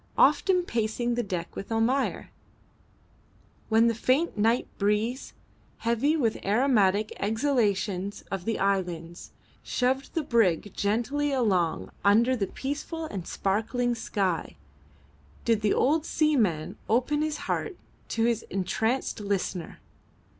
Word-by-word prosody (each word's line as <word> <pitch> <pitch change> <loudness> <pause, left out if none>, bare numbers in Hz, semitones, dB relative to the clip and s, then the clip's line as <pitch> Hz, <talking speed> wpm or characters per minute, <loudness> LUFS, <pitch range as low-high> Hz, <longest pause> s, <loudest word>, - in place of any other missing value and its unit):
Often 365 -2 +4
pacing 235 -2 -1
the 240 - 0
deck 180 -6 -4
with 195 - -7
Almayer, 235 +5 0 1.4
when 225 +1 +5
the 230 - +3
faint 260 +9 +1
night 225 +3 +2
breeze, 210 +5 0 0.4
heavy 235 +7 +1
with 230 -7 0
aromatic 210 -2 +2
exhalations 205 -4 0
of 195 -2 -3
the 225 - 0
islands, 175 -4 -2 0.3
shoved 265 +4 -1
the 325 - +1
brig 210 - +2
gently 240 +8 0
along 195 -11 +1
under 230 +6 +4
the 200 -5 -1
peaceful 295 - -4
and 195 - -6
sparkling 225 +5 0
sky, 195 -6 -2 0.9
did 230 -2 +2
the 210 -1 +2
old 300 +4 +2
seaman 230 - +1
open 255 +6 +2
his 310 0 -1
heart 390 -5 -2 0.3
to 225 - -1
his 230 -1 +2
entranced 220 +8 -1
listener. 195 -4 -3
225 Hz, 120 wpm, -27 LUFS, 200-260 Hz, 1.4 s, when